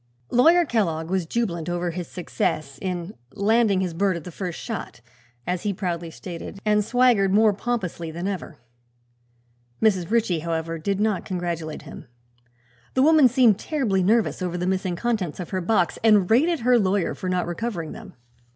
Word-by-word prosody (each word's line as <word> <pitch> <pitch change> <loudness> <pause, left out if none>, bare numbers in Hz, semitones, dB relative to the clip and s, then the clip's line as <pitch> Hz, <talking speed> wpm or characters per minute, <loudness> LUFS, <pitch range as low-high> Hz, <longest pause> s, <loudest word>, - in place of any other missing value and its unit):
Lawyer 330 +8 +5
Kellogg 170 - -1
was 185 -3 0
jubilant 175 -7 -2
over 175 0 -1
his 175 0 -5
success 155 -5 -3
in 180 0 -4 0.2
"landing 210 -1 +3
his 180 -3 -2
bird 190 +1 +1
at 165 - -8
the 180 - -8
first 180 0 -5
shot," 225 - -6 0.5
as 180 0 -2
he 205 - -1
proudly 175 -3 -3
stated, 170 +3 -8
and 210 0 +3
swaggered 230 -4 +3
more 215 +1 +5
pompously 190 -7 -3
than 170 +4 -4
ever. 185 -5 -5 1.2
Mrs. 195 -6 +2
Ritchie, 220 -7 +1
however 165 0 -3
did 195 +4 -1
not 210 -3 +1
congratulate 170 -4 -4
him. - - -11 0.9
The 260 - +4
woman 310 -2 +6
seemed 240 -5 +4
terribly 245 - 0
nervous 215 +2 +2
over 180 -1 -2
the 180 - -2
missing 185 -1 -1
contents 200 -6 -2
of 180 - -6
her 185 -1 -1
box 180 -1 +1
and 210 -5 +5
rated 310 +7 +3
her 245 +1 +4
lawyer 195 -2 +1
for 185 - -5
not 180 -1 0
recovering 175 -2 -4
them. 210 -5 -11
190 Hz, 170 wpm, -24 LUFS, 175-225 Hz, 1.2 s, woman